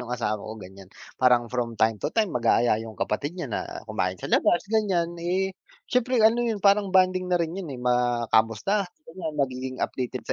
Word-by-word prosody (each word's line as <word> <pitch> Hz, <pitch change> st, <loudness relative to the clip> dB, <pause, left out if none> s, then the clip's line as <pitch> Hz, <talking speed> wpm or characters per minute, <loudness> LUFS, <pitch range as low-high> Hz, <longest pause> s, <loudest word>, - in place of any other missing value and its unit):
nung 125 Hz, -, -8 dB
asawa 110 Hz, -3 st, -1 dB
ko 110 Hz, +2 st, -7 dB
ganyan 95 Hz, -2 st, -12 dB, 0.3 s
parang 125 Hz, -2 st, +5 dB
from 120 Hz, -2 st, -2 dB
time 110 Hz, -1 st, +2 dB
to -, -, -1 dB
time 215 Hz, +2 st, 0 dB
mag-aaya 115 Hz, -2 st, +2 dB
yung 110 Hz, -2 st, -9 dB
kapatid 140 Hz, -, -2 dB
niya 160 Hz, -7 st, -4 dB
na -, -, -1 dB, 0.2 s
kumain 90 Hz, 0 st, -2 dB
sa -, -, -7 dB
labas 175 Hz, -, +3 dB
ganyan 195 Hz, -6 st, 0 dB
eh, 185 Hz, +3 st, 0 dB, 0.4 s
siyempre 250 Hz, -1 st, +1 dB
ano 230 Hz, +2 st, +5 dB
yun 235 Hz, -2 st, 0 dB
parang 200 Hz, 0 st, +4 dB
bonding 185 Hz, -1 st, +3 dB
na 180 Hz, -, +3 dB
rin 165 Hz, -1 st, -1 dB
yun 185 Hz, -2 st, -6 dB
eh, 135 Hz, -, -6 dB
makamusta 120 Hz, -, +1 dB, 0.2 s
ganyan 160 Hz, -1 st, -5 dB
magiging 130 Hz, -2 st, -2 dB
updated 125 Hz, -2 st, -5 dB
sa -, -, -2 dB
130 Hz, 190 wpm, -25 LUFS, 115-185 Hz, 0.4 s, parang